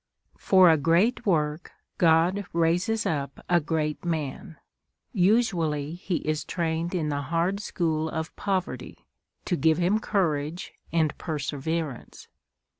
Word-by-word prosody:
For 185 -3 +6
a 160 - +4
great 175 - +2
work 155 -3 0 0.3
God 175 +4 +3
raises 175 +7 +1
up 140 -3 -3
a 175 -1 +4
great 155 -1 -2
man. 160 -2 -3 0.6
Usually 175 - +1
he 180 +1 -3
is 155 0 0
trained 170 +1 -2
in 155 -4 -1
the 145 -1 -1
hard 170 +7 0
school 160 -6 -1
of 160 0 -5
poverty, 190 -3 -3 0.4
to 180 - 0
give 160 -1 +3
him 180 +5 +2
courage 165 -6 -1 0.2
and 160 -3 +1
perseverance. 150 -2 -4
165 Hz, 120 wpm, -26 LUFS, 155-180 Hz, 0.6 s, For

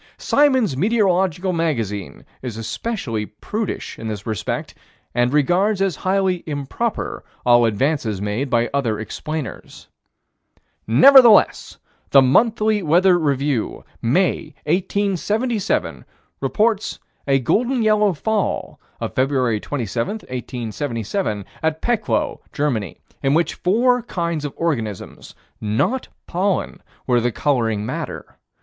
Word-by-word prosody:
Symons' 260 - +2
Meteorological 190 - +1
Magazine 115 - -2 0.2
is 120 -4 -5
especially 115 - -3
prudish 210 - -5
in 115 - -5
this 105 -2 -5
respect 110 -4 -3 0.4
and 120 +1 +2
regards 180 +8 +2
as 195 -6 0
highly 190 -2 0
improper 150 - -3 0.2
all 120 -1 +6
advances 115 -2 0
made 105 +7 -2
by 120 -1 +2
other 120 -7 0
explainers. 155 +6 -6 1.0
Nevertheless, 225 - +6 0.3
the 135 - +7
Monthly 215 - +3
Weather 175 +2 +4
Review, 140 -5 -1 0.2
May, 170 +11 0
1877, 205 +5 -1 0.4
reports 215 -1 0 0.3
a 135 -1 +4
golden 240 - +1
yellow 210 -2 +3
fall, 215 +6 -2 0.2
of - - -4
Feb. 130 -5 +1
27, 120 - -2
1877, 120 - -4 0.2
at 160 0 0
Peckloh, 235 -3 0
Germany, 130 -9 -2 0.2
in 135 +1 +2
which 170 +1 +1
four 245 +7 +2
kinds 170 -7 -3
of 145 - -4
organisms, 115 - -4 0.3
not 110 - 0 0.2
pollen, 190 +2 -1 0.2
were 120 -2 +2
the 120 +1 0
coloring 115 -5 0
matter. - - -6
150 Hz, 105 wpm, -21 LUFS, 120-200 Hz, 1.0 s, the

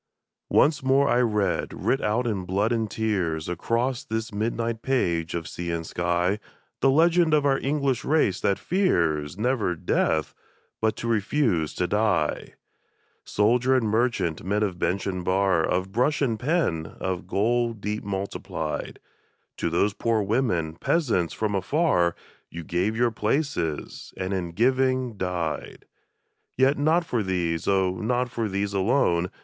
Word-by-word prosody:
Once 150 0 +3
more 135 +2 +3
I 120 - +3
read, 105 -4 0
writ 135 - 0
out 110 +4 0
in 105 -5 -1
blood 100 +5 0
and 115 -2 0
tears, 95 -8 -1
Across 115 +8 -1
this 110 0 -3
midnight 115 +2 -2
page 85 -12 0
of 85 -1 -4
sea 85 0 -5
and 85 -1 -2
sky, 90 +4 0 0.4
The 135 - +4
legend 165 +2 +4
of 145 -1 +2
our 135 -1 +3
English 135 -3 0
race 140 - +1
that 100 - +1
fears, 85 - 0
never 110 -5 0
death, 80 -1 0 0.5
but 110 -1 +1
to 120 - -5
refuse 105 - +1
to 90 - 0
die! 100 -6 0 0.7
Soldier 120 +5 +2
and 120 -4 +2
merchant, 110 -7 0
men 105 +3 0
of 95 -4 -2
bench 90 +3 0
and 90 -2 -3
bar. 95 -2 +2
Of 95 +3 -1
brush 125 +8 +1
and 115 -6 0
pen, 125 - 0
of 90 -1 -3
gold 115 +3 0
deep 105 +1 -3
multiplied, 95 -5 -4 0.6
To - - -1
those 100 +5 +1
poor 110 +1 0
women, 95 -8 0
peasants 110 - +1
from 110 -2 -2
afar. 95 - +1 0.3
You 85 0 -7
gave 90 +7 -1
your 120 0 +2
places, 110 - -2
and 95 +1 -2
in 90 -3 -3
giving 130 +2 +1
died! 90 -4 -4 0.7
Yet 135 +3 +3
not 160 +4 +2
for 120 -7 -1
these, 85 -4 -1
oh, 95 -2 +2
not 125 +3 0
for 115 -3 -2
these 100 +1 -2
alone. 95 -4 +2
105 Hz, 150 wpm, -25 LUFS, 90-125 Hz, 0.7 s, The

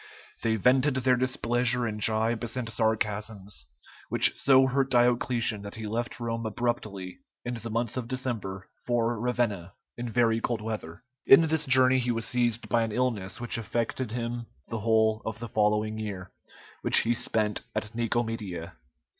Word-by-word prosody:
They 115 -1 +1
vented 130 +5 +3
their 130 0 +3
displeasure 125 -1 0
in 105 -1 -4
jibes 110 +3 0
and 125 -2 -3
sarcasms, 105 - -2 0.4
which - - +5
so 135 -1 +5
hurt 135 +1 +1
Diocletian 120 -3 +2
that 100 0 -8
he 110 -1 -6
left 115 +4 -3
Rome 115 -1 -3
abruptly 110 -5 -3 0.3
in 125 - -3
the 115 -1 -6
month 115 +2 -2
of 125 -2 -3
December 115 -7 -4 0.2
for 120 -1 0
Ravenna, 115 -7 -1 0.2
in 120 0 -5
very 115 -1 +2
cold 120 -1 -1
weather. 105 -7 -6 0.2
In 135 - +9
this 160 -2 0
journey 130 0 +5
he 125 0 -1
was 115 -1 -1
seized 120 -1 0
by 120 - +2
an 115 -1 -1
illness 110 -7 -2
which 120 -1 -1
affected 115 +2 -2
him 120 0 -4 0.2
the 115 - -3
whole 110 0 +2
of 110 0 -4
the 120 +1 -6
following 105 0 0
year, 95 -4 -6 0.5
which - - +8
he 115 - +1
spent 110 -2 -1
at 110 +2 -3
Nicomedia. 115 -7 -3
115 Hz, 160 wpm, -27 LUFS, 110-120 Hz, 0.5 s, In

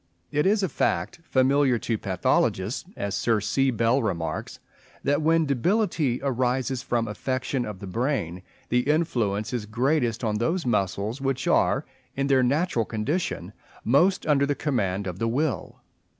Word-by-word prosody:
It 150 +3 +2
is 205 +1 +3
a - - +2
fact 170 - -1
familiar 135 -2 +3
to 115 0 -2
pathologists, 95 - 0
as 100 -1 -3
Sir 115 -2 +2
C. 135 +6 +1
Bell 115 +2 +2
remarks, 85 -8 -3 0.5
"that 145 +2 +2
when 165 +1 +3
debility 150 - +1
arises 130 -1 0
from 120 -1 -1
affection 130 +3 -2
of 105 -3 -6
the 100 - -8
brain, 95 - -2 0.3
the 125 +3 +1
influence 120 -10 0
is 115 -4 -3
greatest 120 +1 0
on 105 -2 0
those 165 +9 0
muscles 105 +2 -1
which 135 -1 -1
are, - - +2 0.3
in 140 - 0
their 135 -2 +4
natural 140 0 +1
condition, 120 - -2 0.3
most 175 - +3
under 140 -2 +3
the 145 - 0
command 100 -11 -1
of 90 0 -5
the 115 - 0
will." 135 +5 -2
125 Hz, 150 wpm, -25 LUFS, 110-145 Hz, 0.5 s, their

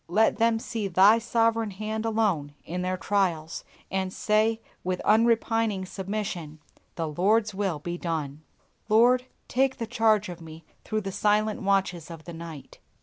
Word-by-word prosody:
Let 215 +6 +3
them 230 0 +3
see 225 -2 -3
Thy 195 +5 +6
sovereign 230 -1 +1
hand 215 +3 -4
alone 195 -11 0
in 180 +3 -4
their 185 0 -1
trials, 175 -6 -1 0.3
and 190 -1 -1
say 220 +2 +1 0.2
with 185 0 -1
unrepining 225 -2 +2
submission, 190 -5 -5 0.4
"The 165 -1 -2
Lord's 205 +7 +2
will 190 -4 -1
be 175 +4 -5
done!" 155 -4 -3 0.5
Lord, 245 +4 +4 0.2
take 265 +1 +1
the 235 - -3
charge 220 -3 +2
of 175 -1 -8
me 160 0 -11 0.2
through 215 -1 -2
the 195 -1 -4
silent 210 +2 +1
watches 190 -4 0
of 165 -2 -9
the 170 - -8
night. 165 -3 -9
200 Hz, 150 wpm, -26 LUFS, 175-220 Hz, 0.5 s, Thy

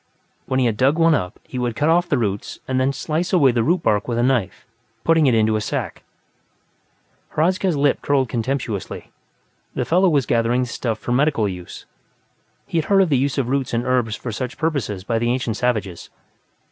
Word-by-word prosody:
When 130 - 0
he 130 - +2
had 115 -3 0
dug 135 +6 +3
one 165 -1 +4
up, 90 -11 -2
he 125 - -6
would 120 -2 -2
cut 145 +4 0
off 175 +2 +3
the 145 - +2
roots 105 -4 -3
and 130 0 0
then 130 +1 +2
slice 160 +5 -2
away 150 -9 +5
the 120 -1 +1
root 170 +8 +1
bark 105 -1 +1
with 120 -1 -2
a 120 - +2
knife, 125 -7 0 0.4
putting 165 -3 +4
it 125 - +3
into 110 0 +2
a 110 - 0
sack. - - -4 1.3
Hradzka's 180 +1 +1
lip 140 0 +2
curled 135 -2 +1
contemptuously; 120 -4 -4 0.6
the - - -1
fellow 185 +3 +3
was 145 -6 +2
gathering 120 +2 +1
the 125 - -1
stuff 115 -2 -3
for 120 - -5
medicinal 135 -4 +2
use. 90 -2 -8 0.8
He 165 - -1
had 155 - -2
heard 195 -1 +4
of 180 - -1
the 140 - +3
use 140 +1 -1
of 135 -4 0
roots 135 -3 -1
and 115 - -1
herbs 125 -4 +1
for 120 - -6
such 125 +4 -5
purposes 135 - -2
by 115 +2 -1
the 120 +1 0
ancient 125 -3 -2
savages. 110 -8 -2
130 Hz, 205 wpm, -21 LUFS, 115-150 Hz, 1.3 s, away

